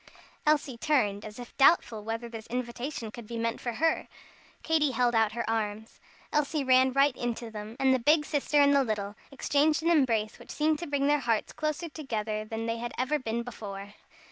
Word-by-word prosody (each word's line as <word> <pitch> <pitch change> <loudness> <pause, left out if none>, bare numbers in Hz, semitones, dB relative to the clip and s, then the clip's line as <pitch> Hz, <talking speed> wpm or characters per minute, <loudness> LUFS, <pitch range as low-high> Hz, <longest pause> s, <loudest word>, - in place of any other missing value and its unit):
Elsie 285 -5 +2
turned 210 -10 +1
as 215 0 -9
if 245 -1 -10
doubtful 255 -7 +4
whether 225 +2 -4
this 225 -1 -9
invitation 240 -1 -4
could 235 -1 -10
be 235 - -5
meant 230 0 -2
for 240 - -3
her. 325 +7 +1 0.6
Katy 315 -2 +2
held 245 0 +2
out 220 -2 +3
her 235 -1 -3
arms. 220 -1 -3 0.3
Elsie 300 0 +1
ran 260 0 +5
right 275 0 +3
into 235 -1 -4
them, 215 +1 -7
and 265 -1 +4
the 260 - +2
big 295 +5 +4
sister 295 0 +1
and 285 0 +6
the 275 - +5
little, 210 -3 -3 0.2
exchanged 295 +3 +1
an 335 - +3
embrace 230 -9 +2
which - - -14
seemed 310 0 +1
to 345 - -5
bring 285 -1 0
their 295 +1 +3
hearts 230 -5 -1
closer 305 +2 -2
together 220 -9 -3
than 225 +1 -5
they 230 0 -2
had 240 0 -5
ever 270 +4 0
been 235 -2 -2
before. 205 -4 -8
240 Hz, 195 wpm, -29 LUFS, 225-290 Hz, 0.6 s, and